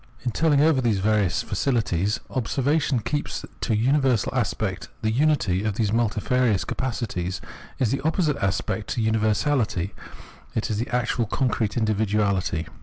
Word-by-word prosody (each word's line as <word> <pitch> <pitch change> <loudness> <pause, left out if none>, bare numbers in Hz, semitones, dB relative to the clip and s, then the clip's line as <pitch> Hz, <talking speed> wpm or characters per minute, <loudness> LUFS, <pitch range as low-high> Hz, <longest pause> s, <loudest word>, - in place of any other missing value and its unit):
In 120 - +1
telling 150 +1 +3
over 155 -3 +4
these 115 -5 +2
various 100 -2 +1
faculties 105 -5 0
observation 135 +2 +1
keeps 145 +7 -3 0.2
to - - -3
the 110 - +3
universal 130 -1 +2
aspect: - - -1 0.2
the 110 - +2
unity 115 -8 +2
of 110 -2 -1
these 105 -2 0
multifarious 115 -1 +1
capacities 105 -8 -3 0.4
is 120 -4 +1
the 135 - -1
opposite 155 -1 +1
aspect 100 +2 -1
to - - -3
this 110 - +1
universahty, 110 - +1 0.6
is 110 -1 -1
the 120 - -2
actual 120 -1 0
concrete 115 -3 0
individuahty. 105 -6 0
115 Hz, 140 wpm, -24 LUFS, 105-130 Hz, 0.6 s, over